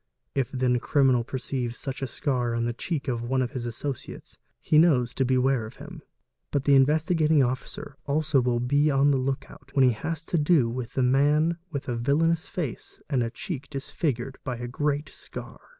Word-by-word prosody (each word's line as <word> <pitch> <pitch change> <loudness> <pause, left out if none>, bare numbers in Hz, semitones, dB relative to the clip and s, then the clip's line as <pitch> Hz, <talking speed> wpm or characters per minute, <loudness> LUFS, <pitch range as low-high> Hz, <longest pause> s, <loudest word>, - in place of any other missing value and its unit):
If 135 -4 0
then 125 -2 +1
a - - -2
criminal 130 -2 +3
perceives 125 -1 -3
such 135 0 -5
a 135 - -1
scar 125 -2 -1
on 115 0 0
the 120 - -1
cheek 145 +4 -3
of 120 -3 -1
one 130 +2 0
of 125 - -4
his 125 -4 -4
associates, 125 +3 -6 0.2
he 155 - +4
knows 130 -8 +4
to 135 - +1
beware 130 -2 +2
of 115 - -12
him. - - -10 0.5
But 140 -2 0
the 140 - +4
Investigating 155 +2 +4
Officer 130 +2 -4
also 150 -1 +2
will 120 -1 +1
be 145 +5 +2
on 140 0 +4
the 135 - +3
look 135 +1 -2
out 140 -1 -16
when 135 -2 +6
he 125 - +5
has 160 +8 -4
to 170 - 0
do 150 -5 +4
with 120 +2 -5
a 130 - +3
man 150 +6 +3
with 140 -3 -4
a 120 - -1
villainous 160 +7 +1
face 155 -10 -5
and 130 -3 +2
R 115 - 0
cheek 160 - -6
disfigured 135 -2 -3
by 125 -3 -3
a 120 +1 -5
great 145 +3 -1
scar. - - -9
135 Hz, 200 wpm, -26 LUFS, 125-150 Hz, 0.5 s, when